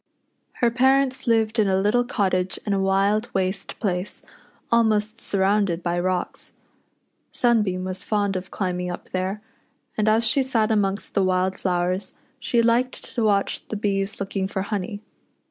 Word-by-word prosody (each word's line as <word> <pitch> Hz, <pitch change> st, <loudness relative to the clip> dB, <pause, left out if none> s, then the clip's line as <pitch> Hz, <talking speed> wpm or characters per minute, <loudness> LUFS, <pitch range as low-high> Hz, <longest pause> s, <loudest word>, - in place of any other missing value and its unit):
Her 240 Hz, -1 st, +1 dB
parents 265 Hz, +2 st, +2 dB
lived 225 Hz, -1 st, +2 dB
in 210 Hz, -, +4 dB
a 190 Hz, -1 st, +2 dB
little 210 Hz, +5 st, +2 dB
cottage 185 Hz, -5 st, 0 dB
in 205 Hz, -, 0 dB
a 195 Hz, -, +1 dB
wild 195 Hz, +4 st, +2 dB
waste 190 Hz, 0 st, -2 dB
place, 185 Hz, -3 st, -2 dB, 0.5 s
almost 220 Hz, -1 st, +2 dB
surrounded 195 Hz, -3 st, +1 dB
by 175 Hz, 0 st, 0 dB
rocks. 180 Hz, 0 st, -2 dB, 0.8 s
Sunbeam 210 Hz, -7 st, +1 dB
was 185 Hz, 0 st, -3 dB
fond 205 Hz, -2 st, 0 dB
of 185 Hz, 0 st, -4 dB
climbing 180 Hz, -2 st, -2 dB
up 175 Hz, -, -8 dB
there, 190 Hz, +3 st, -2 dB, 0.5 s
and 215 Hz, 0 st, 0 dB
as 225 Hz, +2 st, +3 dB
she 275 Hz, +5 st, +4 dB
sat 230 Hz, -5 st, +1 dB
amongst 200 Hz, -2 st, 0 dB
the 200 Hz, -, +2 dB
wild 185 Hz, 0 st, +1 dB
flowers, 185 Hz, +1 st, -1 dB, 0.3 s
she 235 Hz, -2 st, +1 dB
liked 240 Hz, +2 st, 0 dB
to 235 Hz, -, 0 dB
watch 200 Hz, -2 st, +1 dB
the -, -, -4 dB
bees 200 Hz, 0 st, -1 dB
looking 195 Hz, -1 st, -2 dB
for 190 Hz, -1 st, -3 dB
honey. 205 Hz, +1 st, -4 dB
200 Hz, 155 wpm, -23 LUFS, 185-220 Hz, 0.8 s, in